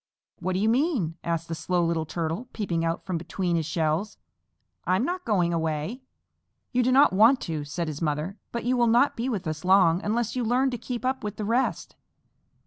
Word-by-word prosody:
"What 185 Hz, +1 st, -2 dB
do 185 Hz, -, 0 dB
you 215 Hz, -, +2 dB
mean?" 230 Hz, -, +1 dB
asked 165 Hz, -1 st, -2 dB
the 165 Hz, -, -4 dB
Slow 175 Hz, +2 st, 0 dB
Little 165 Hz, -2 st, -1 dB
Turtle, 170 Hz, +9 st, -3 dB
peeping 175 Hz, -6 st, -1 dB
out 165 Hz, 0 st, -2 dB
from 180 Hz, -3 st, -2 dB
between 175 Hz, +1 st, -2 dB
his 160 Hz, -2 st, -1 dB
shells. 160 Hz, +5 st, -1 dB, 0.7 s
"I'm 185 Hz, +7 st, +2 dB
not 360 Hz, +3 st, -3 dB
going 180 Hz, -6 st, +1 dB
away." 160 Hz, -, -2 dB, 0.7 s
"You 250 Hz, -, +2 dB
do 250 Hz, +1 st, +2 dB
not 270 Hz, -4 st, +5 dB
want 225 Hz, +7 st, +6 dB
to," 160 Hz, -3 st, -3 dB
said 165 Hz, +3 st, -4 dB
his 155 Hz, 0 st, -5 dB
mother, 155 Hz, +4 st, -1 dB, 0.2 s
"but 235 Hz, -1 st, -4 dB
you 255 Hz, +1 st, +2 dB
will 240 Hz, -1 st, +3 dB
not 240 Hz, +5 st, +4 dB
be 240 Hz, +3 st, -2 dB
with 200 Hz, -7 st, -3 dB
us 155 Hz, -1 st, -4 dB
long 180 Hz, -2 st, +4 dB
unless 230 Hz, +3 st, -1 dB
you 250 Hz, -, 0 dB
learn 255 Hz, +4 st, +2 dB
to 245 Hz, -, -3 dB
keep 250 Hz, 0 st, -5 dB
up 260 Hz, +1 st, -1 dB
with 210 Hz, -1 st, -4 dB
the 215 Hz, -, -3 dB
rest. 230 Hz, -4 st, -1 dB
190 Hz, 210 wpm, -26 LUFS, 165-240 Hz, 0.7 s, want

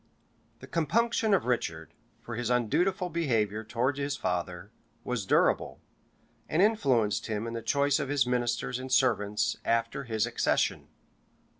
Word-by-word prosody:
} 115 Hz, 0 st, -38 dB
The -, -, -9 dB
compunction 220 Hz, -, +1 dB
of 195 Hz, -, +3 dB
Richard, 80 Hz, -10 st, -2 dB, 0.3 s
for 120 Hz, -, -6 dB
his 120 Hz, 0 st, -2 dB
undutiful 180 Hz, -, +1 dB
behavior 110 Hz, -10 st, 0 dB
towards 125 Hz, +5 st, -1 dB
his 140 Hz, 0 st, -2 dB
father, 90 Hz, +2 st, -3 dB, 0.3 s
was 115 Hz, -6 st, -3 dB
durable, -, -, +2 dB, 0.7 s
and 155 Hz, -, 0 dB
influenced 130 Hz, -, +2 dB
him 110 Hz, 0 st, -2 dB
in 115 Hz, -, -5 dB
the 115 Hz, -, -4 dB
choice 140 Hz, +4 st, +2 dB
of 140 Hz, -3 st, -3 dB
his 145 Hz, -2 st, +2 dB
ministers 125 Hz, 0 st, -1 dB
and 130 Hz, 0 st, -7 dB
servants 105 Hz, -6 st, +2 dB
after 115 Hz, +4 st, 0 dB
his 110 Hz, -3 st, 0 dB
accession. -, -, 0 dB
120 Hz, 145 wpm, -29 LUFS, 110-140 Hz, 0.7 s, of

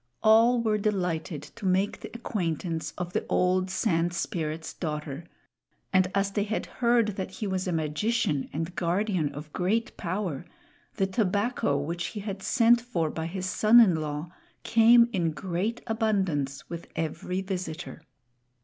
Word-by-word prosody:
All 225 Hz, +3 st, +6 dB
were 215 Hz, -2 st, +1 dB
delighted 180 Hz, -6 st, -1 dB
to 210 Hz, -4 st, -3 dB
make 190 Hz, +2 st, +1 dB
the -, -, -8 dB
acquaintance 165 Hz, -8 st, -2 dB
of 180 Hz, -1 st, -4 dB
the -, -, 0 dB
old 185 Hz, +1 st, +2 dB
Sand 175 Hz, -3 st, 0 dB
Spirit's 160 Hz, -2 st, -3 dB
daughter; 150 Hz, -1 st, -4 dB, 0.7 s
and 185 Hz, -1 st, +4 dB
as 200 Hz, 0 st, +1 dB
they 205 Hz, 0 st, 0 dB
had 215 Hz, +1 st, -2 dB
heard 235 Hz, -2 st, +2 dB
that 190 Hz, -, -3 dB
he 215 Hz, -, -6 dB
was 190 Hz, -1 st, -2 dB
a -, -, 0 dB
magician 155 Hz, -, 0 dB
and 165 Hz, +4 st, -4 dB
guardian 175 Hz, -3 st, 0 dB
of 150 Hz, +1 st, -9 dB
great 220 Hz, +6 st, 0 dB
power, 180 Hz, -5 st, -3 dB, 0.5 s
the 195 Hz, -, +2 dB
tobacco 200 Hz, -, 0 dB
which 170 Hz, +5 st, -3 dB
he 210 Hz, -, -6 dB
had 195 Hz, -1 st, -5 dB
sent 240 Hz, +2 st, +4 dB
for 170 Hz, -10 st, -1 dB
by 160 Hz, 0 st, -3 dB
his 185 Hz, +2 st, -4 dB
son 215 Hz, +5 st, +5 dB
in 215 Hz, -7 st, +7 dB
law 155 Hz, +2 st, -4 dB, 0.3 s
came 235 Hz, +1 st, +6 dB
in 170 Hz, -5 st, 0 dB
great 190 Hz, +7 st, -2 dB
abundance 190 Hz, -, -1 dB
with 170 Hz, 0 st, -7 dB
every 165 Hz, +3 st, -2 dB
visitor. 180 Hz, -4 st, -5 dB
185 Hz, 150 wpm, -27 LUFS, 165-215 Hz, 0.7 s, in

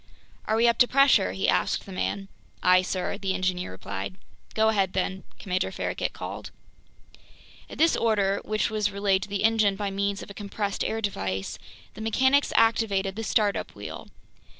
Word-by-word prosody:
"Are 220 Hz, -, +1 dB
we 230 Hz, +1 st, +4 dB
up 235 Hz, -1 st, +2 dB
to 245 Hz, -, +7 dB
pressure?" 270 Hz, -7 st, +4 dB
he 190 Hz, -, -1 dB
asked -, -, +1 dB
the 195 Hz, -, -10 dB
man. 195 Hz, +1 st, -3 dB, 0.4 s
"Aye, 185 Hz, 0 st, +6 dB
sir," 185 Hz, +1 st, -3 dB
the 190 Hz, -2 st, -1 dB
engineer 185 Hz, -1 st, -1 dB
replied. 95 Hz, +1 st, -6 dB, 0.4 s
"Go 220 Hz, 0 st, +4 dB
ahead, 195 Hz, -4 st, +1 dB
then!" 190 Hz, 0 st, -2 dB
Commander 185 Hz, -1 st, -2 dB
Farragut -, -, -2 dB
called. -, -, -7 dB, 1.2 s
At -, -, -9 dB
this 325 Hz, +1 st, +4 dB
order, 200 Hz, -3 st, +1 dB
which 215 Hz, 0 st, -1 dB
was 210 Hz, -1 st, +1 dB
relayed 200 Hz, -1 st, +1 dB
to 205 Hz, -, -6 dB
the 200 Hz, 0 st, -2 dB
engine 215 Hz, -3 st, +3 dB
by 200 Hz, 0 st, -3 dB
means 200 Hz, 0 st, -1 dB
of -, -, -10 dB
a -, -, -8 dB
compressed 200 Hz, 0 st, -3 dB
air 225 Hz, 0 st, -2 dB
device, 95 Hz, -, -3 dB, 0.3 s
the 215 Hz, -, -9 dB
mechanics 260 Hz, +6 st, +3 dB
activated 200 Hz, -4 st, +2 dB
the 225 Hz, -, -4 dB
start 210 Hz, -2 st, +2 dB
up -, -, -5 dB
wheel. -, -, -8 dB
200 Hz, 175 wpm, -26 LUFS, 190-220 Hz, 1.2 s, to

